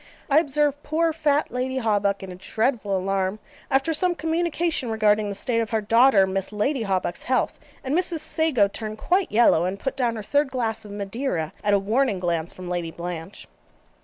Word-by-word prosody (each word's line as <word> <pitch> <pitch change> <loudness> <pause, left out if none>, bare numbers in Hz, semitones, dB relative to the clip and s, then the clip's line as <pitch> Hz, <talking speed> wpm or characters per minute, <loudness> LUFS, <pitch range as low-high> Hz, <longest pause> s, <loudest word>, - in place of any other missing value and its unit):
I 290 - +7
observed 295 -2 0
poor 320 +2 0
fat 300 -2 +1
Lady 255 +1 -2
Hawbuck 205 -5 0
in 190 - -7
a - - -8
dreadful 220 +1 -1
alarm 190 +1 -1 0.3
after 275 +4 +2
some 355 +3 +2
communication 325 -3 -1
regarding 215 -1 +2
the 200 - -4
state 230 +3 0
of 225 -1 -1
her 225 - +1
daughter 225 -1 +5
Miss 190 +1 -2
Lucy 235 +6 0
Hawbuck's 190 -4 -1
health, 255 0 0 0.2
and 270 +3 -1
Mrs. 345 -3 0
Sago 310 -9 +2
turned 215 +1 -6
quite 365 - +1
yellow, 210 -7 +4
and 190 +2 -3
put 265 0 -3
down 245 -4 0
her 215 - -5
third 285 +5 +1
glass 230 -4 -2
of 205 - -10
Madeira, 200 - -3
at 205 -1 +3
a - - +5
warning 215 +1 +1
glance 170 -2 -1
from 185 -1 -10
Lady 175 -2 -2
Blanche. 170 +2 -7
225 Hz, 190 wpm, -24 LUFS, 195-280 Hz, 0.3 s, I